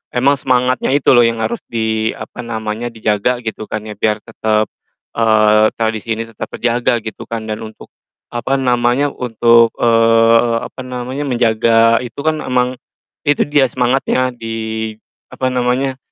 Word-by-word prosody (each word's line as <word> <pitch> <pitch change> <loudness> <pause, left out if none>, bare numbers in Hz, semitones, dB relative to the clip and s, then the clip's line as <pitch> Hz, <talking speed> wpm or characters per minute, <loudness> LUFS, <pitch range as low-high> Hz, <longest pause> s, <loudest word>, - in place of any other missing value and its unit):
emang 140 +3 +3
semangatnya 130 +1 +1
itu 145 - +3
loh 120 - +6
yang 115 -1 -2
harus 115 +2 -2
di, 110 -1 -1
apa - - -10
namanya, 110 -1 -4
dijaga 115 +2 -1
gitu 110 -1 -5
kan 110 -1 -4
ya, 110 - -8
biar 105 -1 0
tetep, 110 -2 -1 0.5
eee, 110 -1 +4
tradisi 110 0 -2
ini 115 - -3
tetap 115 -1 -8
terjaga 120 -1 0
gitu 110 - -8
kan. 115 -1 -4
Dan 110 0 -4
untuk, 110 - -14 0.4
apa 120 +3 -1
namanya, 125 +1 +1
untuk, 115 -1 +3
eee, 115 0 +4
apa - - -10
namanya, 130 +2 -5
menjaga 115 -1 +3
itu 125 +1 -8
kan 155 0 0
emang 125 -1 -1 0.5
itu 145 - +3
dia 145 -2 +2
semangatnya 130 +1 0
di, 110 -1 -5 0.4
apa 130 0 -1
namanya, 125 +2 0
115 Hz, 150 wpm, -16 LUFS, 110-125 Hz, 0.5 s, loh